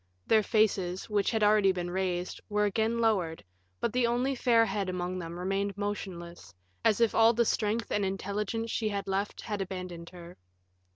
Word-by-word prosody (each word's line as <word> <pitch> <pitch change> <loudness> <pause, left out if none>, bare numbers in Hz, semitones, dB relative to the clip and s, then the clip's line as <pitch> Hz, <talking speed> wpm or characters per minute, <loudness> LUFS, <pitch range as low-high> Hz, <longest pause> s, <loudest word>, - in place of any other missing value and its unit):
Their 220 - +4
faces, 200 -4 +1
which 205 -2 +2
had 220 -2 0
already 210 -2 +5
been 175 -1 -4
raised, 180 -1 -2
were 210 0 +2
again 220 +3 0
lowered, 190 - +1 0.4
but 230 - -1
the 250 -1 +2
only 245 +3 +1
fair 235 -3 +4
head 200 -4 -2
among 180 0 -3
them 170 0 -6
remained 195 +2 -2
motionless, 175 - -5 0.3
as 215 - +3
if 230 -2 +3
all 225 +1 +6
the 235 +1 +2
strength 220 +1 0
and 205 - +1
intelligence 205 +4 -2
she 220 -2 0
had 200 -1 -3
left 195 +2 -2
had 210 -3 -3
abandoned 180 -3 -6
her. 175 -1 -12
200 Hz, 175 wpm, -29 LUFS, 185-220 Hz, 0.4 s, all